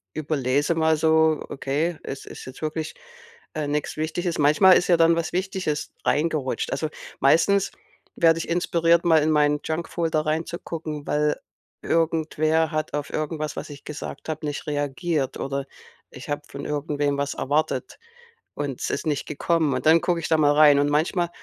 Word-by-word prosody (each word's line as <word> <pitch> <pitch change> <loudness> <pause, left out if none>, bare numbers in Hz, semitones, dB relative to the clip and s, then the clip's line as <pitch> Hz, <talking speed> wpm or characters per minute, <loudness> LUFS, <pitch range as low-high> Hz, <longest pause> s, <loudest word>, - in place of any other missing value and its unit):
überlese 145 0 0
mal 160 0 +3
so: 160 0 +3
„Okay, 150 +5 -2
es 135 - -7
ist - - -10
jetzt 130 +3 -11
wirklich, 155 0 -3 0.6
äh, 155 -2 -2
nichts 145 0 -2
Wichtiges.“ 165 +2 -2
Manchmal 155 +6 +6
ist - - +1
ja 175 - +5
dann 165 0 +4
was 170 - -2
Wichtiges 185 -5 -2
reingerutscht. 150 -3 0
Also, 155 - -1 0.3
meistens 190 +8 +3 0.5
werde 165 -1 +4
ich 165 - -5
inspiriert, 170 0 +2
mal 160 -2 +5
in 155 - +2
meinen 150 -1 +3
Junkfolder 160 -1 -1
reinzugucken, 155 -1 -4
weil 150 0 +1 0.5
irgendwer 160 -1 +1
hat 155 -1 -3
auf 145 -1 -3
irgendwas, 155 0 -3
was - - -5
ich 145 -1 -11
gesagt 150 +1 -7
habe, 155 0 -4
nicht 145 +2 -4
reagiert 145 0 -1
oder 140 0 -3 0.4
ich - - -11
habe 145 - -1
von 140 +1 -7
irgendwem 145 -1 -1
was 140 0 -1
erwartet 155 - -1 0.6
und 145 -3 -4
es - - -1
ist - - -3
nicht 145 -3 -1
gekommen. 155 0 0
Und - - -3
dann 165 +1 +6
gucke 175 -2 0
ich 165 - -3
da 160 - +3
mal 145 -1 +4
rein 150 -1 +6
und 145 - +2
manchmal, 170 +4 +1
155 Hz, 170 wpm, -24 LUFS, 145-165 Hz, 0.6 s, Manchmal